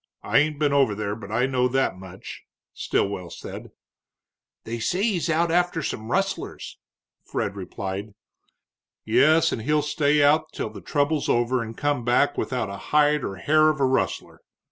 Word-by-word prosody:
I - - +3
ain't 150 0 0
been 145 -1 +1
over 135 -7 +3
there, 100 0 -3
but 105 -2 -10
I 120 +3 +2
know 130 -1 +1
that 135 -4 0
much," 95 0 -10 0.3
Stilwell 95 -3 -2
said. - - -9 0.9
"They 115 +1 -5
say 180 - -1
he's 190 -7 0
out 165 +1 +2
after 175 -2 +1
some 110 -3 -4
rustlers," 195 +4 -3 0.4
Fred 100 - -3
replied. 95 +1 -6 0.9
"Yes, 160 +2 +4
and 115 - -3
he'll 150 +5 +1
stay 150 0 +2
out 155 +2 +3
till 110 - -4
the 100 -2 -10
trouble's 145 0 0
over 120 +1 +1
and 115 0 -7
come 145 -4 0
back 125 +4 +2
without 125 -5 -2
a 100 0 -6
hide 150 -1 +3
or 95 - -4
hair 155 +9 +3
of 155 -2 -1
a 135 - +3
rustler. 130 0 -1
135 Hz, 165 wpm, -24 LUFS, 110-150 Hz, 0.9 s, Yes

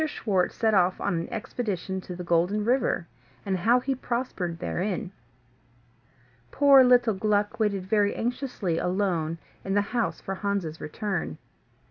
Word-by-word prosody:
SCHWARTZ 200 - 0
SET 220 -1 +2
OFF 185 -2 +3
ON 200 - -1
AN 165 - -4
EXPEDITION 210 -5 -3
TO 180 - -8
THE 180 - -6
GOLDEN 175 +5 +1
RIVER, 245 -7 +1 0.4
AND 195 -1 0
HOW 230 +8 +4
HE 270 +2 0
PROSPERED 235 -9 -3
THEREIN 185 +2 -3 1.4
Poor 275 - +7
little 245 -3 +5
Gluck 205 +2 0
waited 200 -4 0
very 205 +1 +2
anxiously 235 -8 -2
alone 180 -4 0 0.3
in 195 0 -2
the 205 - +4
house 235 -2 0
for 195 - -5
Hans's 190 -5 -3
return. 170 - -3
200 Hz, 140 wpm, -27 LUFS, 180-230 Hz, 1.4 s, Poor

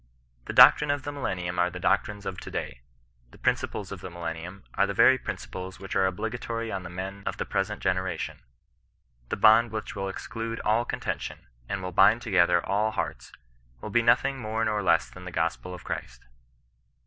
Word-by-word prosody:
The - - -5
doctrines 150 -1 +8
of 145 -2 -5
the 145 - -4
millennium 90 -10 -3
are 90 0 +3
the 90 +1 -8
doctrines 105 +2 0
of 90 - -4
to - - -8
day; - - -5 0.5
the - - -17
principles - - -1
of - - -7
the - - -6
millen 85 -1 -4
nium 90 +4 -9
are 100 - +2
the 100 - -3
very 130 +6 +6
principles 95 -4 -6
which 95 -1 -6
are 95 - +4
obligatory 115 +4 -3
on 95 - -3
the 90 - -8
men 95 +3 -6
of - - -2
the - - -2
present 100 +1 -2
generation; 95 -2 -2 0.9
the - - -2
bond 110 +3 +6
which 110 -1 -5
will 95 -1 -3
ex 95 - -7
clude 115 0 -4
all 115 +3 +2
contention, - - -4 0.2
and 100 -1 -3
will 90 - -4
bind 105 +6 +5
together 90 -5 +3
all 105 +2 +1
hearts, 110 - -4 0.5
will - - -7
be 120 - +4
nothing 120 +3 +3
more 110 0 -1
nor 105 -1 0
less 85 -3 +3
than 90 0 -12
the 90 - -6
gospel 85 +2 -2
of 90 - -8
Christ. 60 0 -6
95 Hz, 195 wpm, -27 LUFS, 90-110 Hz, 0.9 s, doctrines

